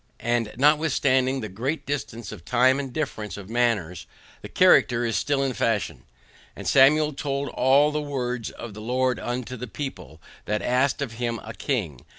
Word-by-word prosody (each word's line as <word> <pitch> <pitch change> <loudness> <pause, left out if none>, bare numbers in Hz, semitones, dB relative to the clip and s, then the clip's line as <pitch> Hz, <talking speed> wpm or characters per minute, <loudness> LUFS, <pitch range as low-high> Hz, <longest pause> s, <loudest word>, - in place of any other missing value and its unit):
And 120 -2 0
notwithstanding 135 -2 +2
the 110 - -4
great 125 - -3
distance 120 -6 -4
of 80 - -10
time 130 +6 +3
and 135 -2 -5
difference 110 - -4
of 100 +1 -10
manners, 110 -8 0 0.3
the - - -9
character 120 0 +4
is 115 - -1
still 140 -1 +1
in 135 -1 -1
fashion. 115 -3 -1 0.5
AND - - -7
SAMUEL 150 +3 +5
TOLD 140 0 -3
ALL 140 +5 +3
THE 150 0 -2
WORDS 125 -5 -3
OF 115 -3 -9
THE 105 - -9
LORD 125 +1 0
UNTO 125 +1 -4
THE 125 +2 -6
PEOPLE, 95 - -7 0.3
THAT 105 0 -2
ASKED 130 +3 +1
OF 130 - -5
HIM 115 0 -3
A 110 - -8
KING. 105 - -3
125 Hz, 170 wpm, -25 LUFS, 115-140 Hz, 0.5 s, SAMUEL